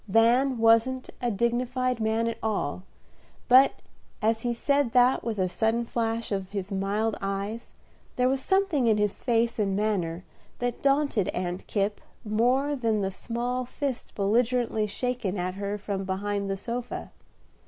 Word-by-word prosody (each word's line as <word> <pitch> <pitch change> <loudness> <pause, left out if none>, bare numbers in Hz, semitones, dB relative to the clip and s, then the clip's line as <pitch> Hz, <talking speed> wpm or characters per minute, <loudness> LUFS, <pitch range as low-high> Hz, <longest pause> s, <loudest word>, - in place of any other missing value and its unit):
Van 235 +5 +4
wasn't 230 +3 +3
a 245 - +1
dignified 245 +3 0
man 220 +1 +1
at 230 -1 -3
all, 200 -8 -1 0.7
but 260 +2 +5 0.4
as 220 +1 +1
he 240 - 0
said 280 +1 +1
that 250 0 +4
with 225 -2 -3
a 185 -1 +1
sudden 225 +5 0
flash 230 -1 -2
of 195 -2 -2
his 200 -1 -4
mild 200 +3 0
eyes, 200 +3 -4 0.4
there 250 0 +2
was 265 +1 +1
something 380 -8 +2
in 220 -2 +4
his 210 -1 0
face 235 -1 +1
and 195 -2 +1
manner 185 -5 -1 0.3
that 245 -1 -3
daunted 275 -8 +2
Aunt 180 0 -3
Kipp 205 0 -1 0.2
more 250 +7 +2
than 225 -5 0
the 190 0 -1
small 245 +5 -2
fist 265 +1 -4
belligerently 225 +1 +1
shaken 225 -3 -2
at 180 0 -2
her 200 +1 -3
from 200 -1 -3
behind 200 +1 -2
the 195 - -1
sofa. 235 +4 -5
225 Hz, 155 wpm, -27 LUFS, 200-245 Hz, 0.7 s, but